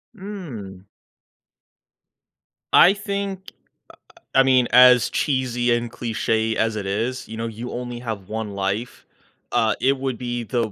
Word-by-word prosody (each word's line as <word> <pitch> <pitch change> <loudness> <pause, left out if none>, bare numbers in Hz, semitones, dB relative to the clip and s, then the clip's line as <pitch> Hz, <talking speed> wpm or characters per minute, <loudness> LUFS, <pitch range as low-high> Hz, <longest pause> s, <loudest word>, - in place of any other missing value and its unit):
Mm. 130 - -8 1.9
I 185 - +8
think, 200 -2 -4
uh - - -28 0.8
uh, - - +6
I - - +7
mean, 130 -2 +4
as 125 -1 +7
cheesy 125 -3 0
and 120 0 -3
cliche 110 -1 -1
as 115 -1 0
it 105 -2 -4
is, 115 +6 -2
you 110 - -8
know, 115 +1 -3
you 115 +2 -7
only 120 -1 -5
have 110 -5 -6
1 110 -1 -4
life, 100 +4 -3 0.5
uh, - - +2
it 135 +1 +2
would 130 -2 -3
be 120 -1 -4
the 115 -1 -2
120 Hz, 145 wpm, -22 LUFS, 110-130 Hz, 1.9 s, I